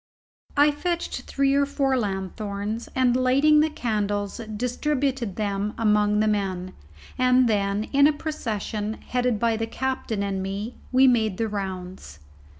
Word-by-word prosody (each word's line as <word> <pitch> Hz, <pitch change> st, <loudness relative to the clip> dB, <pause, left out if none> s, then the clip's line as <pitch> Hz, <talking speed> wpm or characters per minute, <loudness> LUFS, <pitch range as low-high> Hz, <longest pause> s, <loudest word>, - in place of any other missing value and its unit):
I 295 Hz, +1 st, +6 dB
fetched 345 Hz, +4 st, -3 dB
three 275 Hz, 0 st, +2 dB
or 280 Hz, 0 st, +3 dB
four 275 Hz, -1 st, +1 dB
lanthorns, 205 Hz, +1 st, -3 dB
and, 255 Hz, -2 st, +3 dB
lighting 275 Hz, +4 st, +4 dB
the 310 Hz, +1 st, +3 dB
candles, 205 Hz, -7 st, -2 dB, 0.2 s
distributed 255 Hz, -2 st, -1 dB
them 205 Hz, 0 st, -2 dB
among 210 Hz, -1 st, +3 dB
the 215 Hz, -, +2 dB
men, 190 Hz, -3 st, -1 dB, 0.5 s
and 255 Hz, 0 st, +4 dB
then, 200 Hz, -1 st, +1 dB
in 280 Hz, +1 st, +6 dB
a -, -, +4 dB
procession, 220 Hz, -8 st, -3 dB
headed 245 Hz, -3 st, -1 dB
by 230 Hz, -1 st, +1 dB
the 225 Hz, 0 st, -2 dB
captain 240 Hz, -4 st, -2 dB
and 195 Hz, -1 st, -2 dB
me, 200 Hz, +5 st, -4 dB, 0.2 s
we 260 Hz, +1 st, +5 dB
made 220 Hz, -6 st, +2 dB
the 225 Hz, -, 0 dB
rounds. 185 Hz, -, -6 dB
225 Hz, 145 wpm, -25 LUFS, 205-260 Hz, 0.5 s, I